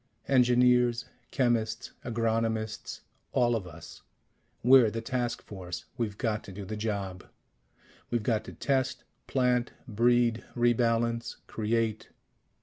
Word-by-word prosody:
Engineers, 125 -2 +4 0.2
chemists, 120 -4 0
agronomists, 115 -2 -1 0.3
all 120 -2 +3
of 100 -5 -3
us 80 -1 -11 0.6
we're 125 -2 +7
the 115 - -4
task 120 +1 -2
force. 90 -3 -7
We've 110 -4 -3
got 110 -4 -1
to - - -9
do 100 +1 -7
the 110 - -5
job. 100 -4 -3 0.8
We've 120 -2 0
got 110 -2 +1
to - - -9
test, 130 -2 -1 0.2
plant, 125 -2 +1
breed, 120 +1 +2
re 120 0 +4
balance, 115 0 0
create. 110 0 -1
115 Hz, 120 wpm, -29 LUFS, 110-120 Hz, 0.8 s, we're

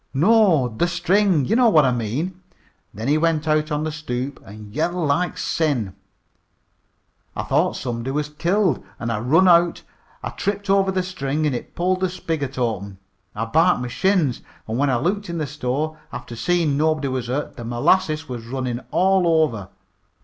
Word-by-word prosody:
"No, 180 - +4
the 125 +9 -1
string. 180 -2 +2
Ye - - 0
know 240 0 +5
what 155 -8 +5
I 130 - +3
mean. 135 - -3 0.5
Then 110 +4 -6
he 150 +2 +3
went 160 -1 +1
out 155 0 +1
on 150 0 -1
the 155 - -2
stoop 140 -3 -5
an' 105 +1 -12
yelled 165 +4 -1
like 175 +5 0
sin. 130 - -1 1.4
I - - -2
thought - - +1
somebody 120 0 -4
was 150 +2 -1
killed 170 - 0 0.2
an' 115 -1 -2
I 105 - -1
run 155 - +4
out. 170 -1 +4 0.4
I - - -3
tripped 200 0 -2
over 195 -1 +3
the 185 -1 0
string 155 -4 -2
an' 145 - +1
it 120 - -6
pulled 185 +1 0
the 185 0 0
spigot 160 -7 -4
open. 100 -5 -2 0.4
I 115 - -2
barked 160 +3 +3
my 125 - -4
shins, 150 +1 +1 0.3
an' 110 - -3
when 140 +1 +2
I 130 - +2
looked 195 - -1
in 170 - -3
the 155 - -1
store, 150 +2 -3
after 120 - -7
seein' 155 +3 +1
nobody 155 -2 +1
was 130 -2 -3
hurt, 135 +4 -3
the 120 - -8
molasses 155 +7 +1
was 120 -3 -7
runnin' 125 -1 -3
all 180 -4 +3
over. 105 -10 -3
150 Hz, 180 wpm, -22 LUFS, 125-175 Hz, 1.4 s, know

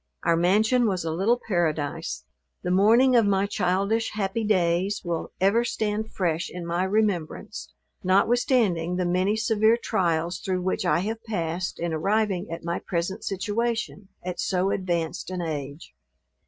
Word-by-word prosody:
Our 170 - +3
mansion 215 +8 +3
was 185 -5 -1
a 160 - -1
little 215 +8 +2
paradise. 155 - -1 0.4
The 180 - -1
morning 230 +7 +5
of 230 -3 +5
my 195 0 +2
childish, 200 +3 0
happy 210 +1 -1
days, 185 -1 +1
will 170 -1 -3
ever 200 +5 +3
stand 220 -2 -2
fresh 170 -3 -1
in 175 -1 -7
my 170 +2 0
remembrance, 195 -5 -1 0.3
notwithstanding 195 -3 +2
the 180 0 0
many 185 +4 +1
severe 220 +1 +3
trials 170 -5 0
through 185 -1 -2
which 185 0 -1
I 175 - +3
have 220 +3 -4
passed, 180 -4 -3
in 170 -1 -2
arriving 200 +3 0
at 165 - -6
my 170 +1 -2
present 180 +4 -3
situation, 210 +1 -2 0.2
at 180 -1 -4
so 190 +1 +1
advanced 170 -4 -2
an 180 -1 -3
age. 145 -1 -5
190 Hz, 150 wpm, -25 LUFS, 170-215 Hz, 0.4 s, morning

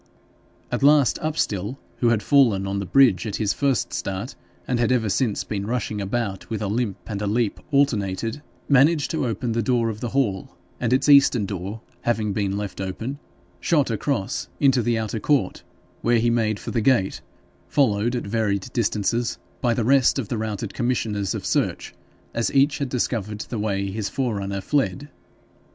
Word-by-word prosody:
At - - -1
last 145 -1 +5
Upstill, 125 - -1 0.2
who 120 - +2
had 110 -3 +1
fallen 115 -9 +4
on 100 0 -2
the 100 - -4
bridge 115 -3 +4
at 105 - -3
his 105 -2 0
first 135 -7 0
start, 95 +7 -3 0.3
and 125 -2 0
had 120 0 +2
ever 115 -4 +2
since 110 +1 0
been 100 -1 -4
rushing 110 -3 -2
about 100 -1 -3
with 110 -2 -2
a - - -1
limp 105 -1 -1
and 100 -1 -4
a 105 - -1
leap 110 0 0
alternated, 115 -4 0 0.3
managed 145 +2 +4
to 155 -6 -1
open 115 +2 -2
the 115 +1 0
door 115 0 +1
of 110 -1 -5
the 120 - -3
hall, 100 -9 -1 0.2
and 120 -1 -1
its 130 +2 +2
eastern 140 -6 +6
door 100 +3 -5 0.2
having 110 -3 0
been 100 -1 -1
left 100 -1 -5
open, 115 +9 -4 0.4
shot 145 - +2
across 115 -2 -2
and - - +1
into 135 -2 +5
the 115 0 +1
outer 110 0 -2
court, 135 -4 +1 0.4
where 120 0 +3
he 115 +1 +2
made 110 -3 +1
for - - -6
the 115 - 0
gate, 110 -5 +2 0.5
followed 120 -3 +2
at 120 - -3
varied 105 +1 -1
distance 115 +1 0 0.2
by 120 -2 +2
the 115 - 0
rest 135 +1 +4
of 125 -7 -3
the 120 - -1
routed 110 -2 -4
commissioners 110 -5 -1
of - - -5
search, - - -1 0.4
as 115 - 0
each 140 +2 +3
had 140 -2 -2
discovered 110 -4 -2
the 115 - -5
way 100 -2 -1
his 105 0 -3
forerunner 100 -7 -2
fled. 145 +4 -1
115 Hz, 180 wpm, -23 LUFS, 100-130 Hz, 0.5 s, eastern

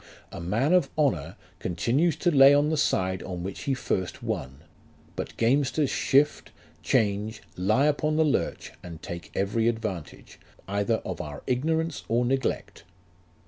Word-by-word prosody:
A - - -7
man 115 - +1
of 180 -7 +4
honour 135 - 0 0.2
continues 130 - +1
to 175 +2 +1
lay 135 +1 +8
on 145 +2 +2
the - - +1
side 95 -11 0
on 90 -2 -5
which 95 +1 -6
he 135 - +1
first 95 -7 -3
won; 65 +2 -4 0.5
but - - -6
gamesters 135 +4 +2
shift, 145 +2 +2 0.3
change, 105 +1 0
lie 110 +10 +2
upon 150 +1 +1
the 160 0 +3
lurch, 145 - -1
and 85 -3 -9
take 85 -2 -7
every 105 +4 +1
advantage, 110 -8 -4 0.3
either 100 +3 +1
of 95 - -4
our 75 -2 -8
ignorance 160 +5 0
or 120 +2 +1
neglect. 130 -7 -2
115 Hz, 145 wpm, -26 LUFS, 95-145 Hz, 0.5 s, lay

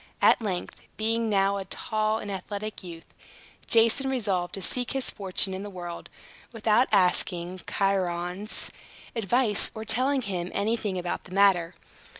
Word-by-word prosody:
At - - +5
length, 190 -5 -5
being 225 +1 0
now 200 -1 +2
a 195 - -5
tall 215 +2 -1
and 205 -2 -6
athletic 205 +2 -5
youth, 170 -3 -10 0.6
Jason 230 +4 +4
resolved 195 -9 -1
to - - -6
seek 245 +6 0
his 270 -1 -1
fortune 190 -1 +2
in 190 - -4
the 205 - -6
world, 175 -3 -7 0.4
without 225 +2 +2
asking 180 -2 +2
Chiron's 185 0 -1 0.4
advice, 225 +1 +2
or 220 0 -6
telling 260 +4 +1
him 180 -4 -3
anything 210 -1 0
about 175 -1 -3
the 180 - -14
matter. 185 -4 +4
200 Hz, 145 wpm, -27 LUFS, 185-220 Hz, 0.6 s, At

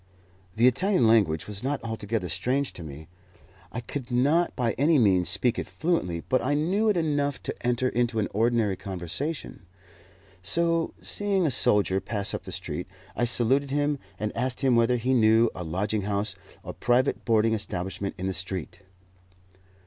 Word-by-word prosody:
The 115 +2 +3
Italian 180 - +3
language 100 -9 +3
was 105 0 -6
not 140 +2 -1
altogether 110 -3 -3
strange 130 +8 -1
to - - -9
me. 75 0 -9 0.6
I 120 - -4
could 125 +1 -6
not 145 +8 +2
by 120 -3 0
any 150 +6 +2
means 95 -7 +3
speak 110 +6 +1
it - - -4
fluently, 120 - -1
but 130 - +2
I 145 +3 +1
knew 190 +9 +1
it 205 - +2
enough 145 -4 0
to - - -3
enter 125 +1 +1
into 120 -2 0
an 105 - +1
ordinary 110 -2 +1
conversation. 100 - -4 0.8
So, 165 - 0
seeing 200 -3 +1
a 150 - +2
soldier 100 -5 +3
pass 100 +1 -2
up - - -5
the - - -7
street, 90 - -5 0.3
I 120 - +1
saluted 130 +4 +3
him 145 0 0 0.2
and 105 0 -3
asked 125 +1 -1
him 130 -3 +3
whether 115 +1 +3
he 125 +3 0
knew 115 -1 +4
a 90 - -6
lodging 100 +6 -1
house 100 +1 -1 0.3
or - - -7
private 125 +3 +1
boarding 115 -1 +2
establishment 100 -2 -3
in 95 - -4
the 95 - -1
street? 90 0 -3
115 Hz, 170 wpm, -26 LUFS, 100-140 Hz, 0.8 s, knew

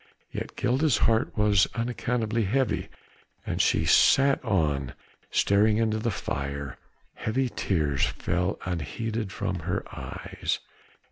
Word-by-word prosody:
Yet - - -5
Gilda's 130 0 +2
heart 115 0 +1
was 105 -3 +4
unaccountably 115 -1 -1
heavy, 125 +3 0 0.6
and - - -2
as - - +3
she - - +2
sat 140 0 +5
on, 75 - 0 0.3
staring 105 +2 +3
into 110 -1 +1
the 115 +2 0
fire, 70 - -4 0.3
heavy 125 +4 -1
tears 75 - -1
fell 90 +3 -1
unheeded 95 +6 -3
from 100 -2 -3
her 85 +3 -2
eyes. - - -4
105 Hz, 120 wpm, -27 LUFS, 85-115 Hz, 0.6 s, sat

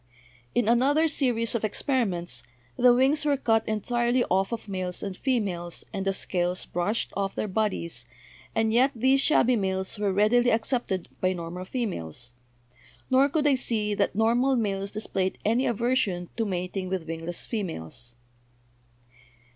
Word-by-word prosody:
"In 240 -3 +2
another 275 +7 +4
series 245 -7 0
of 235 - -1
experiments 195 - -1 0.3
the 250 0 +6
wings 270 +5 +3
were 290 -2 +2
cut 225 -4 +1
entirely 240 +3 +1
off 190 +3 +2
of 230 -2 -4
males 185 -2 -3
and 195 -2 -4
females 185 -9 -2
and 195 -1 -3
the - - +4
scales 180 -1 -1
brushed 200 +6 -2
off 195 -1 -2
their - - -2
bodies, 185 - -1 0.5
and 220 0 +2
yet 255 +4 +5
these 260 +4 +3
shabby 255 -5 +4
males 190 0 -2
were 205 -2 +1
readily 220 +5 +4
accepted 220 -5 0
by 185 0 +2
normal 175 +1 -6
females; 120 - -4 0.8
nor 265 +2 +5
could 300 +1 0
I 290 - +5
see 220 -5 0
that 200 -1 0
normal 240 +5 +3
males 200 -4 -1
displayed 195 -3 -2
any 230 +5 +2
aversion 225 -7 0
to 225 -2 -1
mating 185 0 -3
with 185 -3 -2
wingless 165 +1 -4
females." 120 - -4
210 Hz, 145 wpm, -27 LUFS, 185-245 Hz, 0.8 s, the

